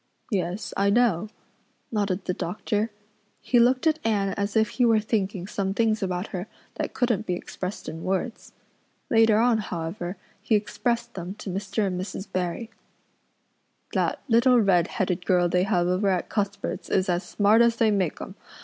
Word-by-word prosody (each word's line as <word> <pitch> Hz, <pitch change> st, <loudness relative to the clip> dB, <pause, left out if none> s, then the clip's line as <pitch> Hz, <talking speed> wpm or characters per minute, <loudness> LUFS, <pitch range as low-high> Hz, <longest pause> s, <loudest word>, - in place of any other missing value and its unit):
"Yes, 190 Hz, 0 st, -2 dB
I 200 Hz, +1 st, +2 dB
know," 215 Hz, -3 st, +3 dB, 0.6 s
nodded 200 Hz, -4 st, -1 dB
the 180 Hz, -, 0 dB
doctor. 210 Hz, +5 st, -2 dB, 0.5 s
He 245 Hz, -, +2 dB
looked 255 Hz, +4 st, +3 dB
at 315 Hz, 0 st, +3 dB
Anne 205 Hz, -3 st, +1 dB
as 200 Hz, +2 st, -2 dB
if 220 Hz, -1 st, +3 dB
he 250 Hz, -, 0 dB
were 225 Hz, -2 st, +5 dB
thinking 200 Hz, -4 st, -1 dB
some 195 Hz, -1 st, -2 dB
things 220 Hz, -1 st, +2 dB
about 185 Hz, 0 st, -2 dB
her 185 Hz, 0 st, -5 dB, 0.3 s
that -, -, -4 dB
couldn't 235 Hz, -4 st, 0 dB
be 180 Hz, -, 0 dB
expressed 185 Hz, +2 st, -6 dB
in 160 Hz, +1 st, -6 dB
words. 195 Hz, +5 st, -3 dB, 0.6 s
Later 225 Hz, -2 st, +5 dB
on, 230 Hz, 0 st, +3 dB
however, 175 Hz, 0 st, -4 dB, 0.2 s
he 215 Hz, +1 st, +2 dB
expressed 235 Hz, +3 st, -1 dB
them 185 Hz, +1 st, -6 dB
to 200 Hz, -, -6 dB
Mr. 200 Hz, +2 st, -1 dB
and 180 Hz, -2 st, -2 dB
Mrs. 190 Hz, 0 st, -6 dB
Barry. 185 Hz, +5 st, -3 dB, 1.2 s
"That -, -, 0 dB
little 245 Hz, +1 st, +5 dB
redheaded 180 Hz, -2 st, +1 dB
girl 180 Hz, -2 st, +3 dB
they 180 Hz, +1 st, +2 dB
have 180 Hz, -4 st, +2 dB
over 185 Hz, +3 st, +1 dB
at 185 Hz, -2 st, 0 dB
Cuthbert's 200 Hz, -1 st, -3 dB
is 185 Hz, -, +2 dB
as 175 Hz, -1 st, +1 dB
smart 210 Hz, +3 st, +3 dB
as 235 Hz, -1 st, +4 dB
they 225 Hz, -2 st, +3 dB
make 190 Hz, -6 st, 0 dB
'em. -, -, -7 dB
200 Hz, 165 wpm, -25 LUFS, 185-225 Hz, 1.2 s, were